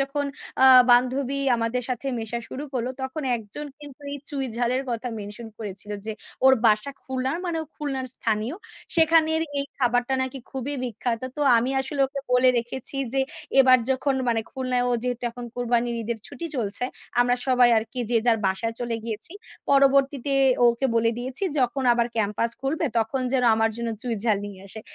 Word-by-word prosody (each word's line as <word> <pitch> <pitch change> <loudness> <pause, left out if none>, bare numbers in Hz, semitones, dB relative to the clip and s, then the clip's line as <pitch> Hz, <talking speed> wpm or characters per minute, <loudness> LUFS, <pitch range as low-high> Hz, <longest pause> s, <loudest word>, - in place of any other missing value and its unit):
যখন 275 +1 -1 0.4
আ - - +9 0.2
বান্ধবী 255 +3 +3 0.2
আমাদের 230 +2 -1
সাথে 255 +2 -3
মেশা 225 +1 -3
শুরু 280 - -6
করল 245 -2 -2 0.2
তখন 265 +4 -4
১ 225 - -8
জন 295 0 -5
কিন্তু 290 -1 -12
এই - - -3
চুঁই 275 -2 -2
ঝালের 245 +2 0
কথা 235 +1 -3
মেনশন 210 +3 -8
করেছিল 205 -1 -7 0.2
যে 220 - -2 0.3
ওর 265 - +8
বাসা 215 +5 +3
খুলনার 265 +4 -2
মানে 335 -2 -1
ও - - -10
খুলনার 270 -3 -3
স্থানীয়। 220 +6 -1 0.4
সেখানের 320 -1 +4 0.2
এই 280 - 0
খাবারটা 245 +1 +1
নাকি 260 +1 -4
খুবই 270 +2 -4
বিখ্যাত। 235 0 -3 0.2
তো - - -4 0.2
আমি 240 +3 +1
আসলে 275 +1 -4
ওকে 275 +1 -6
বলে 250 +1 +5
রেখেছি 240 +3 -5 0.2
যে 270 - +1 0.4
এবার 255 -1 +7
যখন 265 +1 +1
মানে 230 -1 +2
খুলনায় 255 -1 0
ও - - +1
যেহেতু 245 -1 -2
এখন 245 +1 -8
কুরবানির 240 0 0
ঈদের 225 0 -3
ছুটি 335 - -6
চলছে, 225 +1 -1 0.4
আমরা 245 0 +3
সবাই 250 -2 +5
আরকি 225 +3 -5
যে 235 - +3
যার 230 -2 +4
বাসায় 225 +4 -1
চলে 235 -1 -2
গিয়েছি, 225 +7 -5 0.4
পরবর্তীতে 275 0 +3 0.3
ওকে 235 +3 +2
বলে 230 0 +3
দিয়েছি 255 +7 -3 0.2
যখন 255 +1 +1
আবার 235 0 +2
ক্যাম্পাস 215 +2 +1
খুলবে 305 +4 -1
তখন 225 +4 -1
যেন 255 -2 +2
আমার 225 0 +2
জন্য 235 0 -3
চুঁই 235 -2 -2
ঝাল 215 -3 +3
নিয়ে 195 -2 -10
আসে। 220 +3 -9
250 Hz, 180 wpm, -25 LUFS, 230-270 Hz, 0.4 s, আ